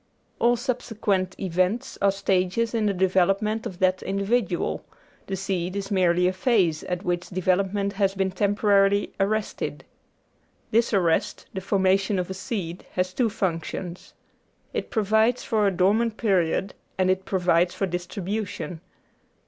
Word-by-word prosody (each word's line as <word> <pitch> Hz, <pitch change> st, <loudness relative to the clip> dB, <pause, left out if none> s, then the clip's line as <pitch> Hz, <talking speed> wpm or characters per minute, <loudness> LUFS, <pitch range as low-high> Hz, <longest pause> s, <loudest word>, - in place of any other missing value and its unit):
All 240 Hz, +1 st, +4 dB
subsequent 220 Hz, -6 st, -1 dB
events 185 Hz, +6 st, 0 dB
are 200 Hz, -, +4 dB
stages 195 Hz, +3 st, 0 dB
in 220 Hz, -2 st, +1 dB
the 200 Hz, -, +1 dB
development 195 Hz, +4 st, +1 dB
of 180 Hz, -, -9 dB
that 185 Hz, 0 st, +2 dB
individual; 195 Hz, -1 st, -1 dB, 0.4 s
the 195 Hz, -, -2 dB
seed 185 Hz, -1 st, -2 dB
is 200 Hz, 0 st, -4 dB
merely 180 Hz, -2 st, +3 dB
a 185 Hz, -, +1 dB
phase, 185 Hz, -7 st, +2 dB
at 180 Hz, +1 st, -3 dB
which 175 Hz, -1 st, -2 dB
development 195 Hz, +2 st, 0 dB
has 195 Hz, -1 st, +1 dB
been 190 Hz, 0 st, 0 dB
temporarily 200 Hz, 0 st, +2 dB
arrested. 210 Hz, +2 st, -1 dB, 0.9 s
This 230 Hz, +2 st, +3 dB
arrest, 175 Hz, -6 st, +1 dB
the 190 Hz, -, -4 dB
formation 195 Hz, +1 st, +2 dB
of 180 Hz, 0 st, -2 dB
a -, -, -2 dB
seed, 190 Hz, -4 st, -5 dB
has 185 Hz, 0 st, -1 dB
two 235 Hz, +2 st, +1 dB
functions. 180 Hz, -3 st, -4 dB, 0.6 s
It -, -, -3 dB
provides 220 Hz, +2 st, +2 dB
for 215 Hz, -3 st, +2 dB
a -, -, +3 dB
dormant 210 Hz, +5 st, +2 dB
period 190 Hz, -3 st, +1 dB, 0.2 s
and 185 Hz, 0 st, +3 dB
it 185 Hz, 0 st, -1 dB
provides 180 Hz, -2 st, +2 dB
for 195 Hz, -, 0 dB
distribution. 180 Hz, -1 st, -4 dB
195 Hz, 140 wpm, -25 LUFS, 185-210 Hz, 0.9 s, All